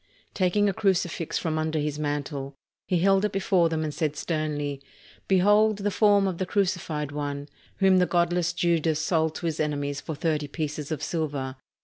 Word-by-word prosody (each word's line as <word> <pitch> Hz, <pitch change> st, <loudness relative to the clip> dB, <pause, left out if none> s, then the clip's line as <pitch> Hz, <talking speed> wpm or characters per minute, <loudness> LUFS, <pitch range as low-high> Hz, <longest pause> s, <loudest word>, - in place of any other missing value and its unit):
Taking 205 Hz, +2 st, +2 dB
a 200 Hz, -, +1 dB
crucifix 180 Hz, -5 st, 0 dB
from 155 Hz, -1 st, -1 dB
under 155 Hz, 0 st, -1 dB
his 150 Hz, 0 st, -2 dB
mantle, 145 Hz, -2 st, -3 dB, 0.3 s
he 180 Hz, -, +2 dB
held 195 Hz, +3 st, +3 dB
it 210 Hz, -, +1 dB
before 190 Hz, -3 st, +2 dB
them 160 Hz, -1 st, -1 dB
and 150 Hz, -1 st, -3 dB
said 150 Hz, -2 st, -1 dB
sternly: 145 Hz, -3 st, -2 dB, 0.5 s
"Behold 205 Hz, +3 st, +4 dB
the 205 Hz, 0 st, -1 dB
form 205 Hz, -1 st, +4 dB
of 180 Hz, -3 st, -3 dB
the 185 Hz, -, -1 dB
crucified 175 Hz, -7 st, -1 dB
One, 145 Hz, -1 st, -4 dB, 0.3 s
whom 190 Hz, -1 st, +5 dB
the 180 Hz, -, +3 dB
godless 175 Hz, 0 st, +1 dB
Judas 165 Hz, -3 st, +1 dB
sold 160 Hz, -1 st, +1 dB
to -, -, -5 dB
his 160 Hz, -2 st, -2 dB
enemies 145 Hz, -2 st, -1 dB
for 160 Hz, -, -5 dB
thirty 155 Hz, -1 st, -1 dB
pieces 150 Hz, 0 st, -4 dB
of 155 Hz, -1 st, -3 dB
silver. 145 Hz, -5 st, -2 dB
160 Hz, 175 wpm, -26 LUFS, 150-185 Hz, 0.5 s, whom